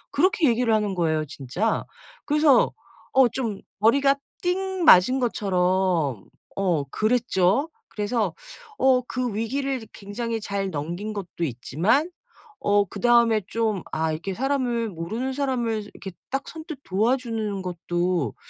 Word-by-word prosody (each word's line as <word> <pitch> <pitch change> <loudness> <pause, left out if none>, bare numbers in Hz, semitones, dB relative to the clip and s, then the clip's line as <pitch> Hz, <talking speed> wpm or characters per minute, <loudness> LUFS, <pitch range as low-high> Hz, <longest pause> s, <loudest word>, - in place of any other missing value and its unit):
그렇게 340 0 +3
얘기를 235 -1 +2
하는 210 -2 0
거예요 155 -3 +1
진짜. 150 - -2 0.4
그래서 300 -2 +4 0.4
어 265 -2 +6
좀 225 -5 -3 0.2
머리가 275 +6 +4 0.3
띵 375 0 -1
맞은 255 - +7
것처럼 185 - +1 0.3
어 180 -7 +1
그랬죠. 225 - +1 0.2
그래서 215 +2 -1 0.4
어 260 -1 +4
그 250 -4 -2
위기를 260 +1 -2
굉장히 225 +3 -4
잘 200 -2 -3
넘긴 175 +7 -4
것도 180 -4 -5
있지만 170 - 0 0.5
어 205 0 +3
그다음에 235 +1 +3
좀 220 -5 -1
'아 160 0 0
이렇게 170 +5 -4
사람을 245 -4 0
모르는 220 +10 -4
사람을 245 -6 -1
이렇게 190 - -8 0.2
딱 270 +1 -3
선뜻 315 -3 -8
도와주는 220 -1 -1
것도 175 - -1
220 Hz, 265 characters per minute, -24 LUFS, 185-255 Hz, 0.5 s, 맞은